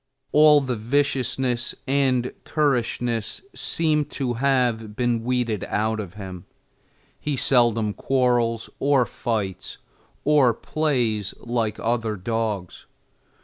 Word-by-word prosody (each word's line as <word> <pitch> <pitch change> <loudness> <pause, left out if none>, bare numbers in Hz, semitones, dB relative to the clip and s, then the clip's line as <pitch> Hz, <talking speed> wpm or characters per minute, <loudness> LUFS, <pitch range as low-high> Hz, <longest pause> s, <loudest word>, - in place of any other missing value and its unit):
All 150 -1 +7
the 130 -2 -2
viciousness 125 0 0
and 130 -2 +1
currishness 120 - -1
seem 155 -2 0
to 135 -3 -3
have 120 -4 0
been 120 -2 0
weeded 120 -4 -1
out 110 +1 -1
of 100 -2 -6
him; 95 -4 -8 0.7
he 150 -1 -2
seldom 120 -5 +3
quarrels, 120 -3 +1
or 140 -2 +3
fights, 110 -7 -3 0.5
or 140 -6 +4
plays, 120 -11 -1
like 115 -3 -2
other 115 -2 -1
dogs. 105 -2 -3
120 Hz, 105 wpm, -24 LUFS, 110-135 Hz, 0.7 s, All